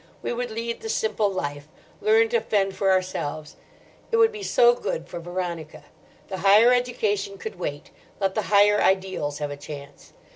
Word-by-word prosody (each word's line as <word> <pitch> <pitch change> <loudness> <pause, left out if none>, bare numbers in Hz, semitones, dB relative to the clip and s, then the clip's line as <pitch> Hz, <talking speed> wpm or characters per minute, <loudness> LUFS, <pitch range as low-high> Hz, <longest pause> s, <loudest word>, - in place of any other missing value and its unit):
We - - -2
would 245 0 -3
lead 230 +1 -4
the 445 - -6
simple 435 - 0
life, 145 -5 -4 0.3
learn 445 +1 +4
to 475 0 +2
fend 195 -2 0
for 195 0 +1
ourselves. 155 -5 -2 0.6
It 460 - +2
would 450 0 +5
be 425 -2 -8
so 240 -10 +4
good 170 -8 -4
for 175 - -7
Veronica. 170 -2 -5 0.4
The 190 - -5
higher 210 +6 +6
education 215 -5 -1
could 190 -1 -8
wait; 145 -3 -5 0.3
let 195 -1 0
the 215 - 0
higher 205 0 +5
ideals 190 -7 0
have 145 -1 -4
a 145 - -6
chance. 140 -1 -11
195 Hz, 175 wpm, -24 LUFS, 170-235 Hz, 0.6 s, higher